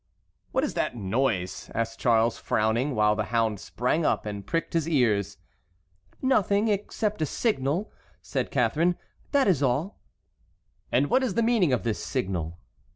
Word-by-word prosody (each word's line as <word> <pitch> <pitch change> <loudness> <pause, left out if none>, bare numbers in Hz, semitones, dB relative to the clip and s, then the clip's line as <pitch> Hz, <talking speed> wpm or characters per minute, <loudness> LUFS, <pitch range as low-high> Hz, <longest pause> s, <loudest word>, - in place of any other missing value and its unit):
"What - - +1
is - - -1
that - - -1
noise?" 100 -2 -1
asked 115 0 -2
Charles, 115 -1 +2
frowning, 115 +6 0
while 105 0 +3
the - - -1
hound 115 -3 0
sprang 125 +11 -1
up - - +1
and 100 -1 -5
pricked 165 - -2
his 165 -1 0
ears. 105 - +1 0.9
"Nothing 210 -4 +2
except 210 0 -1
a - - +3
signal," 175 - -1 0.3
said - - -3
Catharine; 170 +3 +1 0.3
"that 280 -4 +3
is 175 -8 +3
all." 140 +9 0 0.9
"And 130 +4 +3
what 260 - +4
is 250 -8 -1
the 230 - +2
meaning 225 - +3
of 125 - +1
the 115 -2 +1
signal?" 90 - -3
130 Hz, 155 wpm, -26 LUFS, 110-185 Hz, 0.9 s, what